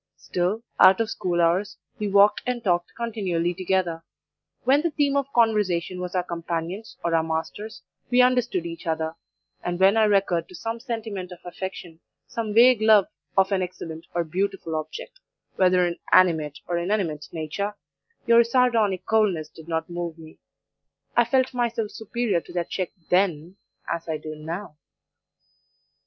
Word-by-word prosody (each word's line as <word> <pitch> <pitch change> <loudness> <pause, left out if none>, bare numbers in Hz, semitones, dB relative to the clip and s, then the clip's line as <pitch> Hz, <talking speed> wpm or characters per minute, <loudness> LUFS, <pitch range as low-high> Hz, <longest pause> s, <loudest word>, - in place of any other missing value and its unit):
Still, 185 +6 -2 0.2
out 190 +2 +7
of 225 0 0
school 175 -1 -1
hours 175 +4 +1 0.2
we 210 - -1
walked 200 +1 +5
and 245 -2 -2
talked 175 -3 +1
continually 190 -7 -1
together; 180 -2 -1 0.6
when 270 +4 +4
the 335 - +1
theme 285 -2 +1
of 280 0 0
conversation 205 -7 +1
was 180 0 -5
our 180 - +1
companions 170 +4 -5
or 170 - 0
our 165 - +4
masters 160 +7 -4 0.3
we 245 - +3
understood 250 -8 +3
each 165 0 -7
other, 160 0 -1 0.5
and 175 0 -2
when 195 +3 +5
I 220 - +5
recurred 195 -5 +1
to 185 - -11
some 225 +6 -4
sentiment 220 -7 -5
of 180 - -8
affection, 175 -2 -7 0.3
some 225 -2 -4
vague 235 +1 +6
love 215 -3 +5 0.3
of 195 +1 +4
an 195 -1 +2
excellent 170 -2 -6
or 175 - +2
beautiful 185 0 -2
object, 470 - -6 0.4
whether 180 -1 +4
in 170 -1 -3
animate 160 -5 +4
or 175 -1 0
inanimate 170 -5 -1
nature, 175 +6 -3 0.5
your 235 -1 +6
sardonic 230 -6 +2
coldness 195 -8 +1
did 160 +1 -14
not 160 -1 -2
move 175 -1 -5
me. 160 -1 -14 0.8
I 240 - +5
felt 260 +2 +1
myself 235 -3 -1
superior 225 -4 -1
to - - -13
that 175 -2 -3
check 185 -3 -2 0.2
THEN 180 -1 +1 0.3
as 170 0 -4
I 155 - -1
do 155 0 -7
NOW. 160 +2 -6
185 Hz, 160 wpm, -25 LUFS, 170-220 Hz, 0.8 s, out